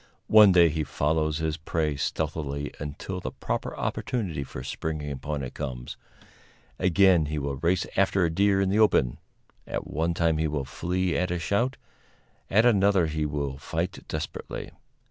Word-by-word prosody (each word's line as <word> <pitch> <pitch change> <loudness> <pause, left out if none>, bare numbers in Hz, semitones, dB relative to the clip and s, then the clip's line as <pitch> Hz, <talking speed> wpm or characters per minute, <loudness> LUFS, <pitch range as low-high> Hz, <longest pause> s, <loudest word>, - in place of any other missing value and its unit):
One 105 -2 +9
day 85 -2 +6
he 80 0 -1
follows 75 +2 0
his 80 -1 -1
prey 80 -1 -1
stealthily 70 -1 -3
until 75 +6 -5
the - - -4
proper - - -4
opportunity 95 - -2
for 65 -1 -8
springing 75 0 -4
upon 70 +1 -4
it 65 - -6
comes; 65 -5 -5 0.8
again 90 -3 +4
he 75 +1 -3
will 70 -1 -2
race 85 +5 +1
after 95 -1 +3
a 80 - 0
deer 100 +3 +3
in 95 -1 +2
the 100 +3 +2
open; 65 - +3 0.5
at - - -3
one 80 +3 -1
time 80 -2 +2
he 80 - +1
will 75 -3 -2
flee 90 +6 -1
at 90 - 0
a 90 - -1
shout, 100 +10 0 0.7
at 110 +4 +4
another 100 -5 +4
he 80 -1 -1
will 70 -2 -3
fight 85 +5 -3
desperately. - - -5
80 Hz, 165 wpm, -27 LUFS, 75-95 Hz, 0.8 s, One